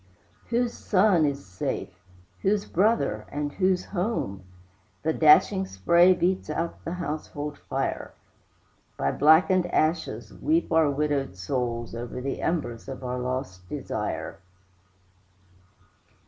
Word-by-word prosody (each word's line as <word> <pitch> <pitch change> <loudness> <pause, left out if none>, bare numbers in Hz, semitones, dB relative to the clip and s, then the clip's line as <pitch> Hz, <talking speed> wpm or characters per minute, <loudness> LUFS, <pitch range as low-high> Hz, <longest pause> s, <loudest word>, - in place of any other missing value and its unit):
Whose 240 0 +1
son 185 -5 +3
is 140 -4 -2
safe? 90 -1 -5 0.4
whose 200 +1 +1
brother, 150 - +1
and 145 0 -2
whose 185 +2 +1
home? 175 - -2 0.6
The 160 +1 +1
dashing 190 +6 +5
spray 170 - +4
beats 185 -1 0
out 165 +2 -3
the 170 - -4
household 150 -3 -5
fire; - - -3 0.9
By 70 - 0
blackened 175 +5 +4
ashes 155 -10 -1
weep 320 - 0
our 160 -2 +4
widowed 140 -4 -1
souls 120 +4 -3
Over 120 +2 -5
the 135 +2 -4
embers 120 -9 -2
of 135 -1 -7
our 125 0 -3
lost 125 -8 -4
desire. - - -4
150 Hz, 115 wpm, -26 LUFS, 125-180 Hz, 0.9 s, dashing